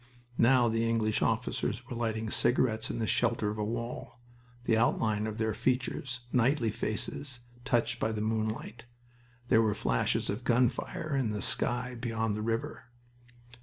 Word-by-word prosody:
Now 120 0 +5
the 115 0 +1
English 110 -2 +1
officers 120 +1 -1
were 125 - -5
lighting 110 -2 -2
cigarettes 120 -2 +2
in - - -3
the 115 - 0
shelter 115 -2 +1
of 105 - -6
a - - 0
wall, 120 +2 -5 0.4
the 115 - +2
outline 110 -2 +1
of 110 0 -5
their 110 -1 0
features 125 +1 -1
knightly 125 -1 +3
faces 120 +5 -3 0.2
touched 120 0 +1
by 110 - 0
the 110 - -3
moonlight. 110 +1 -2 0.6
There 115 -2 +6
were 110 -2 +1
flashes 60 - 0
of 105 +5 -3
gun 125 0 +4
fire 155 +4 -4
in 130 -5 +1
the 105 -1 -2
sky 125 +1 +1
beyond 115 -3 -2
the 105 - -3
river. 115 +1 -2
115 Hz, 160 wpm, -30 LUFS, 110-120 Hz, 0.6 s, There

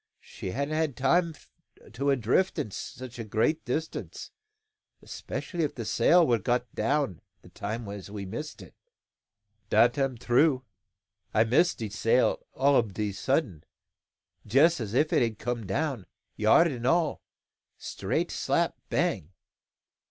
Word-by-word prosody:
She - - -8
hadn't 140 +9 -2
had 155 -4 -1
time 165 +5 +2 0.6
to 140 +5 -1
a' 140 - +4
drifted 135 - 0
to - - -7
such 125 -1 -8
a - - -3
great 115 +9 0
distance, 155 +5 -4 0.7
'specially 175 -3 -4
if 150 - -2
the 115 - -5
sail 170 +11 +4
were 120 -5 +2
got 120 +2 -1
down 125 - 0 0.2
the - - -15
time 110 +2 -5
as 100 -1 -7
we 100 -1 -6
missed 115 +11 -7
it." - - -16 1.0
"Dat 120 +1 +4
am 135 -3 0
true. 130 +3 +2 0.7
I 110 - +6
miss 130 +10 +3
de 110 - -4
sail 115 +4 +1
all 140 +1 +3
ob 110 -5 -1
a 105 -1 -1
sudden, 100 - -1 0.8
jess 145 +10 +4
as 110 0 -4
if 155 +4 +2
it - - +4
had 115 -3 0
come 120 -3 -4
down, 135 -1 -2 0.3
yard 110 +11 +5
an' 125 -6 -3
all, 165 +1 +1 0.6
straight - - -2
slap - - 0
bang." 75 - 0
125 Hz, 145 wpm, -28 LUFS, 110-150 Hz, 1.0 s, I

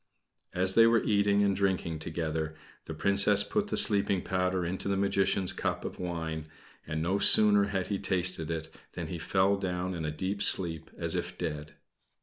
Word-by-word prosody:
As 95 +1 +3
they 115 +2 +6
were 115 0 +3
eating 100 -1 +2
and 100 -1 +1
drinking 95 -5 -1
together, 80 -1 -4 0.3
the 80 - -7
Princess 100 +3 +4
put 210 - -2
the - - -2
sleeping 100 -3 +2
powder 90 -1 -1
into 95 +3 -4
the 100 -1 0
Magician's 100 -1 +1
cup - - -3
of - - -7
wine 80 -3 -5 0.4
and 80 0 -3
no 95 +4 0
sooner 105 -1 +6
had 100 -2 -3
he 100 -2 -2
tasted 90 -4 -1
it 80 -1 -5 0.2
than - - -6
he - - -5
fell 100 +1 +1
down 90 -1 -3
in 85 -2 -5
a 75 - -2
deep 95 +6 -4
sleep 85 -6 0
as - - -3
if - - -4
dead. 75 -3 -5
95 Hz, 180 wpm, -29 LUFS, 80-100 Hz, 0.4 s, they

